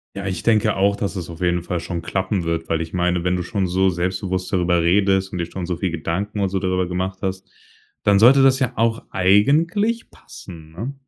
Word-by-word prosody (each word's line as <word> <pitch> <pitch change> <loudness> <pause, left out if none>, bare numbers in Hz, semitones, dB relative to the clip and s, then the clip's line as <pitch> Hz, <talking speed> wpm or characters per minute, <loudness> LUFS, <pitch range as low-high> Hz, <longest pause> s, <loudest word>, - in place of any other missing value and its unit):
Ja, 100 -1 -5
ich 95 -1 -3
denke 110 -2 +2
auch, 100 +1 +2
dass 100 -2 -3
es 90 -2 -5
auf 80 - -10
jeden 90 -1 +1
Fall 90 0 -3
schon 85 0 -5
klappen 95 +1 -2
wird, 85 0 -2
weil 80 0 0
ich 80 - -8
meine, 90 -1 0
wenn 90 0 +1
du 90 - -1
schon 95 +1 -2
so 95 +2 +2
selbstbewusst 95 +1 -2
darüber 90 -2 +2
redest 95 +2 +2
und 90 - -4
dir 85 - -2
schon 95 - -5
so 90 0 -3
viel 95 0 -1
Gedanken 90 +6 -3
und 95 -1 0
so 95 - -1
darüber 95 -1 0
gemacht 95 +1 -3
hast, 95 0 -4 0.5
dann 100 -1 +4
sollte 130 +6 +7
das 135 -1 +5
ja 130 -2 0
auch 115 0 0
eigentlich 165 - +2
passen, 80 -4 -13
ne? 115 +11 -6
95 Hz, 220 wpm, -21 LUFS, 90-100 Hz, 0.5 s, sollte